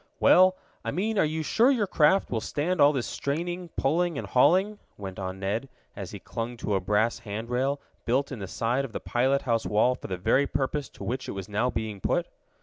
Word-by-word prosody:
"Well, 185 Hz, 0 st, +6 dB, 0.3 s
I -, -, -3 dB
mean 210 Hz, +3 st, -1 dB
are -, -, +5 dB
you 155 Hz, +1 st, -2 dB
sure 230 Hz, -, +3 dB
your 240 Hz, -7 st, +2 dB
craft 185 Hz, +1 st, +3 dB
will 115 Hz, -3 st, -1 dB
stand 150 Hz, +8 st, -1 dB
all 145 Hz, +1 st, +7 dB
this 130 Hz, -5 st, -2 dB
straining, 175 Hz, +5 st, -3 dB
pulling 165 Hz, +3 st, +1 dB
and -, -, -4 dB
hauling?" 190 Hz, +11 st, +3 dB, 0.2 s
went 95 Hz, -2 st, -7 dB
on 95 Hz, 0 st, -5 dB
Ned, 105 Hz, +7 st, -2 dB, 0.3 s
as -, -, -6 dB
he -, -, -7 dB
clung 120 Hz, +1 st, -5 dB
to 105 Hz, -, -2 dB
a 95 Hz, -, +2 dB
brass 105 Hz, +5 st, +1 dB
hand 110 Hz, +1 st, -6 dB
rail, 135 Hz, +3 st, 0 dB, 0.2 s
built 135 Hz, +4 st, 0 dB
in 130 Hz, -, -5 dB
the 100 Hz, -, -5 dB
side 120 Hz, +7 st, 0 dB
of 130 Hz, -5 st, -7 dB
the -, -, -3 dB
pilot 130 Hz, +3 st, +1 dB
house 115 Hz, -3 st, 0 dB
wall 110 Hz, +4 st, +3 dB
for 125 Hz, -, -8 dB
the 95 Hz, -, -3 dB
very 130 Hz, +10 st, +2 dB
purpose 140 Hz, +1 st, -2 dB
to -, -, -11 dB
which 130 Hz, +2 st, -3 dB
it -, -, -3 dB
was 95 Hz, -1 st, -6 dB
now 105 Hz, +4 st, 0 dB
being 110 Hz, -4 st, -4 dB
put. -, -, +1 dB
130 Hz, 225 wpm, -27 LUFS, 110-155 Hz, 0.3 s, all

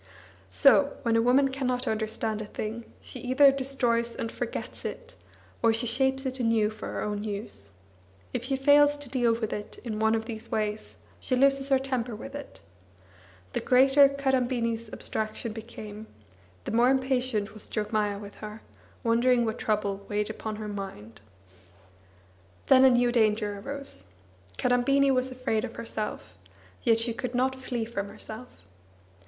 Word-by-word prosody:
So, 95 Hz, -, +4 dB
when 230 Hz, -2 st, +2 dB
a 230 Hz, -, +4 dB
woman 260 Hz, +4 st, +4 dB
cannot 255 Hz, -2 st, -1 dB
understand 220 Hz, 0 st, -2 dB
a 210 Hz, -, -6 dB
thing, 220 Hz, +3 st, -5 dB, 0.2 s
she 255 Hz, -, -9 dB
either 260 Hz, +3 st, +5 dB
destroys 245 Hz, -4 st, 0 dB
and 225 Hz, -, -4 dB
forgets -, -, -5 dB
it, -, -, -6 dB, 0.5 s
or 230 Hz, -, +5 dB
she 225 Hz, +2 st, +1 dB
shapes 265 Hz, +3 st, +1 dB
it 260 Hz, 0 st, -3 dB
anew 225 Hz, -3 st, +2 dB
for 215 Hz, -, -8 dB
her -, -, -3 dB
own 210 Hz, 0 st, -3 dB
use; 200 Hz, -, -6 dB, 0.6 s
if -, -, -2 dB
she 270 Hz, +1 st, 0 dB
fails 290 Hz, +2 st, +5 dB
to 290 Hz, -3 st, -7 dB
deal 240 Hz, -3 st, +2 dB
with 225 Hz, -2 st, -3 dB
it 210 Hz, -, -6 dB
in 220 Hz, -3 st, -4 dB
one 220 Hz, +1 st, +3 dB
of 220 Hz, 0 st, -2 dB
these 225 Hz, -1 st, -7 dB
ways, 210 Hz, 0 st, -3 dB, 0.2 s
she 255 Hz, -, 0 dB
loses 275 Hz, +1 st, +3 dB
her 270 Hz, -, +5 dB
temper 255 Hz, -3 st, -2 dB
with 275 Hz, +6 st, -9 dB
it. 285 Hz, -1 st, -9 dB, 0.9 s
The -, -, 0 dB
greater 270 Hz, +2 st, +6 dB
Kadambini's 245 Hz, -5 st, -1 dB
abstraction 215 Hz, +1 st, -3 dB
became, 220 Hz, -1 st, -9 dB, 0.6 s
the -, -, -4 dB
more 235 Hz, +3 st, +4 dB
impatient 255 Hz, -5 st, 0 dB
was 215 Hz, -, -10 dB
Jogmaya 210 Hz, -2 st, -1 dB
with 205 Hz, -1 st, -9 dB
her, 215 Hz, +1 st, -8 dB, 0.4 s
wondering 240 Hz, +1 st, +3 dB
what 220 Hz, +1 st, -3 dB
trouble 200 Hz, -2 st, -1 dB
weighed 210 Hz, +1 st, -1 dB
upon 220 Hz, 0 st, -5 dB
her 215 Hz, 0 st, -6 dB
mind. 155 Hz, -, -7 dB, 1.4 s
Then 260 Hz, -1 st, +6 dB
a -, -, +8 dB
new 245 Hz, -1 st, +3 dB
danger 215 Hz, -3 st, +1 dB
arose. 275 Hz, -, -4 dB, 0.5 s
Kadambini 270 Hz, +3 st, +3 dB
was 255 Hz, 0 st, +1 dB
afraid 255 Hz, -4 st, -1 dB
of 240 Hz, -2 st, -5 dB
herself; 220 Hz, -2 st, -5 dB, 0.5 s
yet 230 Hz, 0 st, +3 dB
she 230 Hz, 0 st, +1 dB
could 245 Hz, +1 st, -4 dB
not 260 Hz, +1 st, 0 dB
flee 245 Hz, -3 st, -3 dB
from 200 Hz, -3 st, -4 dB
herself. 220 Hz, +5 st, -9 dB
235 Hz, 160 wpm, -28 LUFS, 215-260 Hz, 1.4 s, a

